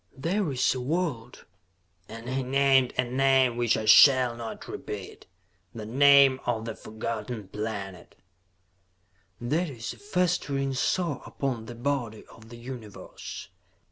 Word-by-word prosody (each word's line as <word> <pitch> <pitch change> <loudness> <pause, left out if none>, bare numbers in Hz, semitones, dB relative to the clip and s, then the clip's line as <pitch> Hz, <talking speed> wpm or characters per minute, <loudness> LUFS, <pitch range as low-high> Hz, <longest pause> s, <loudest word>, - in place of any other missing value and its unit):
"There 170 +4 -1
is 130 0 +1
a 130 - -4
world" 150 -4 -3 0.6
and 115 +2 -9
he 130 +1 -1
named 135 0 +3
a 125 - +3
name 130 0 +2
which 120 -1 +1
I 110 - -3
shall 125 +2 +7
not 115 -1 -8
repeat, - - -8 0.5
the 110 -2 -6
name 140 +2 +5
of 115 -2 -1
the 115 - -4
Forgotten 110 -1 -6
Planet 100 -3 -6 1.2
"that 155 +8 -1
is 115 -4 -6
a - - -17
festering 180 -9 -1
sore 150 +2 -1
upon 125 -5 -4
the 120 - -8
body 120 -3 -3
of 115 0 -16
the 120 - -11
Universe. 120 -4 -9
125 Hz, 135 wpm, -27 LUFS, 115-140 Hz, 1.2 s, shall